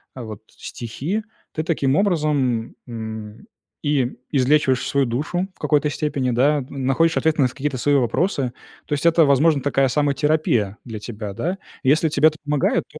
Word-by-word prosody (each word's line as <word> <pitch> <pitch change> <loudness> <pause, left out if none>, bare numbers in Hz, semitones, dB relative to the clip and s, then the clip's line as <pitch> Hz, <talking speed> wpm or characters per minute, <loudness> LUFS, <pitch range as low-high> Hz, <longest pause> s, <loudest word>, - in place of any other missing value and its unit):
вот, 110 -5 -7
стихи, 150 - -5 0.3
ты 155 - -2
таким 145 -4 +1
образом, 150 - +1
м, 110 - -7 0.4
и 140 -4 +1
излечиваешь 135 -1 +2
свою 140 -2 +1
душу 155 +10 -2
в - - -30
какой-то 150 0 +2
степени, 145 -4 -1
да, 140 +4 +2
находишь 140 +5 +1
ответы 160 -2 +2
на 130 - +5
какие-то 135 +2 -3
свои 145 +4 +2
вопросы. 130 - 0 0.3
То 150 - -3
есть 145 +3 -2
это, 165 -1 +5
возможно, 145 +2 +4
такая 135 0 +2
самотерапия 140 -6 +1
для 110 -3 -6
тебя. 105 -1 -6
Если - - -16
тебя, 180 +3 -1
да, - - -20 0.3
если 155 +4 +3 0.2
это 155 - -13
помогает, 145 -1 +1
то 155 - -13
140 Hz, 160 wpm, -22 LUFS, 125-155 Hz, 0.4 s, на